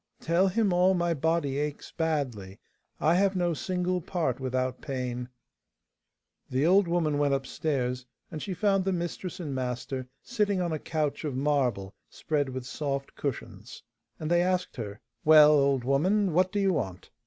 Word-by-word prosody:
'Tell 170 Hz, +4 st, +2 dB
him 200 Hz, 0 st, +1 dB
all 180 Hz, +2 st, +4 dB
my 175 Hz, -1 st, +1 dB
body 160 Hz, -2 st, 0 dB
aches 150 Hz, 0 st, -4 dB
badly; 130 Hz, -, -2 dB, 0.4 s
I 155 Hz, +3 st, +3 dB
have 195 Hz, +2 st, +2 dB
no 175 Hz, -2 st, +1 dB
single 180 Hz, +2 st, -1 dB
part 155 Hz, -8 st, -2 dB
without 130 Hz, -1 st, -2 dB
pain.' 125 Hz, -2 st, -4 dB, 1.2 s
The 130 Hz, +3 st, +1 dB
old 190 Hz, +2 st, +5 dB
woman 160 Hz, -4 st, +1 dB
went 145 Hz, -1 st, +3 dB
upstairs, 130 Hz, -2 st, -2 dB, 0.2 s
and 155 Hz, -2 st, -5 dB
she 190 Hz, -3 st, -4 dB
found 195 Hz, +1 st, +2 dB
the 190 Hz, 0 st, 0 dB
mistress 175 Hz, +1 st, -4 dB
and 150 Hz, -6 st, -4 dB
master 130 Hz, 0 st, -3 dB, 0.2 s
sitting 210 Hz, -5 st, 0 dB
on 175 Hz, -2 st, -1 dB
a 155 Hz, -, -2 dB
couch 150 Hz, -2 st, -2 dB
of 145 Hz, -4 st, -3 dB
marble 130 Hz, -9 st, 0 dB, 0.2 s
spread 145 Hz, -3 st, -1 dB
with 130 Hz, -1 st, -5 dB
soft 140 Hz, 0 st, -3 dB
cushions, 115 Hz, -5 st, -6 dB, 0.4 s
and 155 Hz, +1 st, -3 dB
they 175 Hz, 0 st, +4 dB
asked 180 Hz, 0 st, 0 dB
her, 105 Hz, -3 st, -6 dB, 0.2 s
'Well, 155 Hz, -1 st, +8 dB
old 140 Hz, -3 st, +3 dB
woman, 180 Hz, +9 st, +2 dB
what 185 Hz, +2 st, +3 dB
do 205 Hz, -, -1 dB
you 195 Hz, -2 st, +2 dB
want? 95 Hz, -, -4 dB
150 Hz, 165 wpm, -28 LUFS, 130-180 Hz, 1.2 s, Well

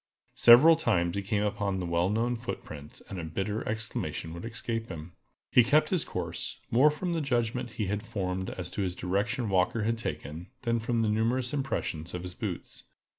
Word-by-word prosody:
Several 130 Hz, +8 st, +8 dB
times 95 Hz, -, +1 dB
he 100 Hz, -, 0 dB
came 100 Hz, +1 st, 0 dB
upon 100 Hz, -2 st, -1 dB
the 90 Hz, -, -2 dB
well 85 Hz, +1 st, +1 dB
known 115 Hz, +4 st, +1 dB
footprints, 75 Hz, -10 st, -7 dB
and 95 Hz, -, -6 dB
a -, -, -4 dB
bitter 95 Hz, +7 st, -2 dB
exclamation 110 Hz, -6 st, -3 dB
would 85 Hz, -, -7 dB
escape 115 Hz, 0 st, -4 dB
him. 85 Hz, -1 st, -7 dB, 0.4 s
He 125 Hz, -, +7 dB
kept 155 Hz, +5 st, +3 dB
his 180 Hz, -5 st, +2 dB
course, -, -, -4 dB
more 130 Hz, +6 st, +6 dB
from 170 Hz, +4 st, -2 dB
the 165 Hz, -, 0 dB
judgment 120 Hz, -3 st, -1 dB
he 105 Hz, -, -2 dB
had 100 Hz, +2 st, -1 dB
formed 95 Hz, -5 st, -3 dB
as 90 Hz, -1 st, -5 dB
to -, -, -3 dB
the 90 Hz, -, -7 dB
direction 105 Hz, +7 st, -1 dB
Walker 95 Hz, +3 st, +2 dB
had 115 Hz, +1 st, 0 dB
taken, 75 Hz, -1 st, -5 dB, 0.2 s
than 115 Hz, -1 st, +1 dB
from 115 Hz, 0 st, 0 dB
the 110 Hz, -, +2 dB
numerous 120 Hz, +4 st, +1 dB
impressions 90 Hz, -, -2 dB
of 90 Hz, -, -5 dB
his 90 Hz, 0 st, -6 dB
boots. -, -, -6 dB
110 Hz, 190 wpm, -29 LUFS, 90-120 Hz, 0.4 s, Several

